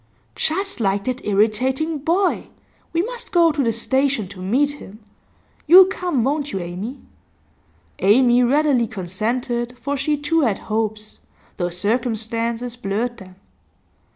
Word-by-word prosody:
'Just 390 +3 -2
like 200 -2 0
that 255 +2 -3
irritating 255 +10 +1
boy! 350 +6 0 0.4
We 335 +1 +1
must 480 +2 -6
go 340 -2 +5
to 295 -2 -1
the 230 - +2
station 265 -1 0
to 195 -2 -11
meet 260 +10 +1
him. 200 - -11 0.7
You'll 365 +4 +10
come, 360 -9 -1
won't 285 +2 -1
you, - - -3
Amy?' 185 +9 -6 1.0
Amy 240 +4 +4
readily 265 -1 +2
consented, 235 +6 -3
for 280 +3 -3
she 290 +2 0
too 320 +3 +1
had 225 -8 +1
hopes, 215 -1 -3 0.4
though 175 -2 -1
circumstances 230 +4 -2
blurred 235 +2 -3
them. 185 -3 -13
245 Hz, 130 wpm, -21 LUFS, 215-290 Hz, 1.0 s, You'll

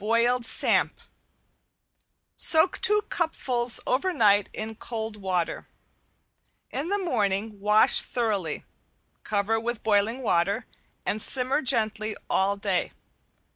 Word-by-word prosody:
~BOILED 235 +2 +1
SAMP~ - - +1 1.4
Soak 320 +3 +5
two 420 0 +4
cupfuls 250 -8 +1
over 280 +9 0
night 205 - +2
in 220 +1 -6
cold 220 -1 -6
water. 185 -4 -3 1.0
In 285 +4 -4
the 405 - 0
morning 215 - -2
wash 210 +2 +4
thoroughly, 205 -10 -3 0.6
cover 215 +2 -1
with 235 0 -5
boiling 220 +4 0
water, 200 +3 0 0.4
and 215 - -2
simmer 260 +5 +1
gently 220 -4 -1 0.2
all 195 +1 +1
day. 200 -3 -2
220 Hz, 105 wpm, -25 LUFS, 205-250 Hz, 1.4 s, Soak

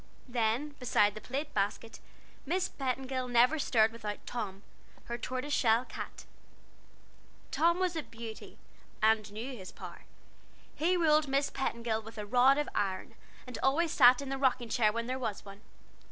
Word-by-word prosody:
Then, 240 +3 0
beside 210 -5 +3
the 215 - -9
plate 280 +6 -4
basket, 210 +3 -2 0.4
Miss 360 +6 0
Petingill 260 -1 -3
never 245 +6 +4
stirred 225 -5 +3
without 215 -2 -6
Tom, 205 -5 -5 0.4
her 235 - -4
tortoiseshell 255 -1 +1
cat. - - -8 1.3
Tom 340 +2 +3
was 365 -2 0
a 320 - -1
beauty, 230 -4 -10 0.4
and 215 -1 +2
knew 235 +5 -5
his 190 -5 -9
power; - - -10 0.7
he 355 +4 +1
ruled 305 -3 +4
Miss 275 +1 +1
Petingill 235 -4 -2
with 225 +1 -12
a 210 - -4
rod 250 +5 +5
of 295 - 0
iron, 195 +2 -2 0.3
and 250 - -7
always 315 +5 +2
sat 250 +3 +6
in 275 - -6
the 270 0 -3
rocking 255 -3 +1
chair 220 -2 +3
when 230 +2 -3
there 255 +2 -3
was 220 -6 -4
one. 200 0 -11
245 Hz, 155 wpm, -31 LUFS, 220-275 Hz, 1.3 s, sat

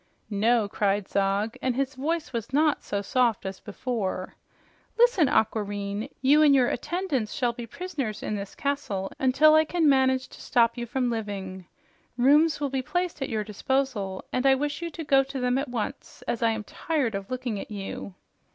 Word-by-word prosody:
"No!" 220 +2 +2
cried 205 -1 0
Zog, 200 +3 0
and 255 -2 0
his 270 +1 -1
voice 310 +3 -2
was 230 -1 -4
not 300 +1 +2
so 200 0 -3
soft 235 -2 +1
as 190 0 -5
before. 205 -4 -3 0.6
"Listen, 465 - +5
Aquareine, 205 +1 -1
you 290 +3 +6
and 290 -2 +6
your 250 -2 +4
attendants 285 - -2
shall 245 -2 0
be 235 0 -7
prisoners 275 - -4
in 215 - -2
this 200 -1 -6
castle 275 -10 -2
until 275 +4 +5
I 315 0 +6
can 325 0 +1
manage 260 -2 +3
to - - -13
stop 235 -1 +3
you 240 -1 -5
from 250 0 0
living. 195 -5 -5 0.5
Rooms 295 +6 +4
will 285 -2 -2
be 265 -1 0
placed 355 +3 -2
at 270 - -2
your 215 -2 -1
disposal, 210 -3 -2
and 255 +2 +2
I 270 - +6
wish 290 +4 -2
you 340 - -3
to 325 0 -7
go 275 -2 +5
to 270 0 -6
them 250 +1 +1
at 275 - -2
o 235 -4 0
nce, - - -16
as 235 - -1
I 230 - +4
am 220 -1 -2
tired 280 - -2
of 195 0 -5
looking 250 -5 -3
at - - -8
you." 200 -2 -6
250 Hz, 190 wpm, -26 LUFS, 210-280 Hz, 0.6 s, you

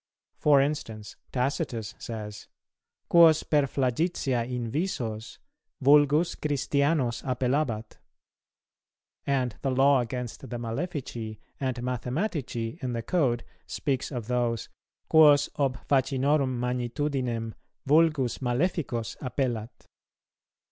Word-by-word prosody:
For 145 -2 +5
instance, 115 -7 -3 0.2
Tacitus 125 -4 -2
says, 105 -3 -7 0.6
"Quos 165 -2 +6
per 145 -2 +2
flagitia 130 -2 0
invisos, 120 - -3 0.4
vulgus 145 +4 +4
Christianos 140 -3 0
appellabat;" 125 -3 -1 1.3
and 130 -5 0
the 135 - 0
Law 135 +1 +4
against 125 +1 -5
the 120 - -4
Malefici 120 - -4 0.2
and 130 -2 -1
Mathematici 125 - -3
in 125 -1 -2
the 115 -1 -3
Code 125 -5 +1 0.2
speaks 135 -3 -2
of 120 -5 -4
those, 120 -2 -1 0.4
"Quos 150 -2 +6
ob 135 -2 +1
facinorum 135 0 +2
magnitudinem 125 -1 -2 0.3
vulgus 150 -4 +3
maleficos 125 -2 -1
appellat." 125 -3 -3
130 Hz, 95 wpm, -27 LUFS, 120-145 Hz, 1.3 s, Quos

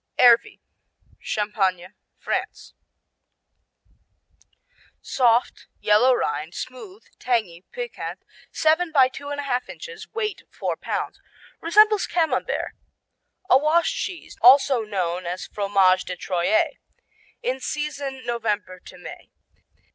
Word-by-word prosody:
Ervy 240 -1 +5 0.6
Champagne, 195 -3 -1 0.2
France - - -4 2.3
Soft; 240 -2 +1
yellow 215 +5 +4
rind; 155 -2 -3
smooth; 370 - -8 0.2
tangy; 215 -8 -1
piquant; 485 -1 -6 0.3
seven 320 +2 +2
by 270 -4 +6
two 280 +2 -9
and 290 0 -4
a - - -3
half 250 -2 -2
inches, 455 -2 -10
weight 425 -2 -3
four - - -3
pounds. - - -4 0.4
Resembles 420 +4 +4
Camembert. 335 -2 -1 0.7
A 260 - +6
washed 320 +3 +2
cheese, 360 -3 -5
also 260 0 +6
known 185 -4 -3
as 180 +2 -4
Fromage 195 -2 +2
de 180 - -4
Troyes. 180 +4 +1 0.7
In 260 +1 -1
season 280 -2 -4
November 210 -6 -2
to - - -14
May. - - -11
250 Hz, 105 wpm, -23 LUFS, 195-305 Hz, 2.3 s, by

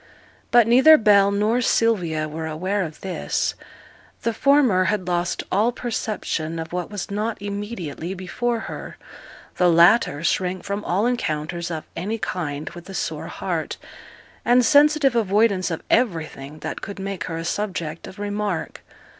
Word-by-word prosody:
But 240 -2 +6
neither 265 +7 +7
Bell 200 -3 +5
nor 210 +4 +1
Sylvia 180 -11 +1
were 160 +1 -5
aware 185 +6 -1
of 160 -4 -6
this. 190 -2 -2 0.7
The 230 - 0
former 260 -9 +4
had 195 -3 -1
lost 175 -1 -1
all 215 +5 +3
perception 215 -9 -3
of 160 +1 -6
what 180 -1 -3
was 205 -1 -6
not 215 +2 -2
immediately 200 -4 -5
before 230 +6 -2
her; - - -7 0.6
the 180 -1 +4
latter 170 -2 +4
shrank 185 +1 0
from 200 +1 -3
all 195 +5 +1
encounters 170 -7 -2
of 160 -2 -4
any 210 +6 -3
kind 160 -8 -4
with 175 +2 -11
a 195 - -7
sore - - -3
heart, - - -3 0.7
and 245 0 +4
sensitive 290 -1 +5
avoidance 205 -3 +2
of 165 - -4
everything 160 - 0
that - - -5
could 200 - -7
make 195 -1 -4
her 165 -2 -4
a 165 - -5
subject 170 -5 -3
of 190 - -11
remark. 205 -3 -3
195 Hz, 150 wpm, -23 LUFS, 170-225 Hz, 0.7 s, neither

